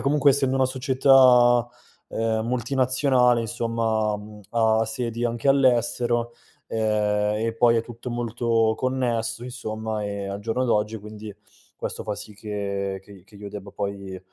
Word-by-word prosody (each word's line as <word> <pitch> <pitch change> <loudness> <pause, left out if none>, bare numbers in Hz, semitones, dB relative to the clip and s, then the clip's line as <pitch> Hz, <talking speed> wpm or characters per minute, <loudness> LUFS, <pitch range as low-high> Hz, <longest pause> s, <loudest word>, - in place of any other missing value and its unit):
comunque 145 0 +3
essendo 135 -1 +1
una 130 - +3
società, 130 -2 +5 0.4
uhm, 110 0 -1
multinazionale, 125 0 +2
insomma, 115 -2 -1
mhmm, 105 0 -11
ha 110 -1 +2
sedi 115 +1 -3
anche 120 +3 -2
all'estero, 120 -3 +2 0.3
ehm, 105 -1 0
e 115 - -2
poi 115 0 +4
è 115 - +1
tutto 120 +1 -9
molto 115 -1 0
connesso 120 -2 -1
insomma, 110 -3 -4
ehm, 100 -1 -4
al 100 +1 -5
giorno 115 +4 -1
d'oggi 110 -2 0
quindi 105 0 -9 0.4
questo - - -5
fa 105 - -3
sì 105 - -9
che 100 -2 -4
che 100 - -20
i 95 -3 -15
che 100 - -23
io 100 0 -8
debba 100 -1 -8
poi, 100 -2 -5
115 Hz, 145 wpm, -24 LUFS, 105-125 Hz, 0.4 s, società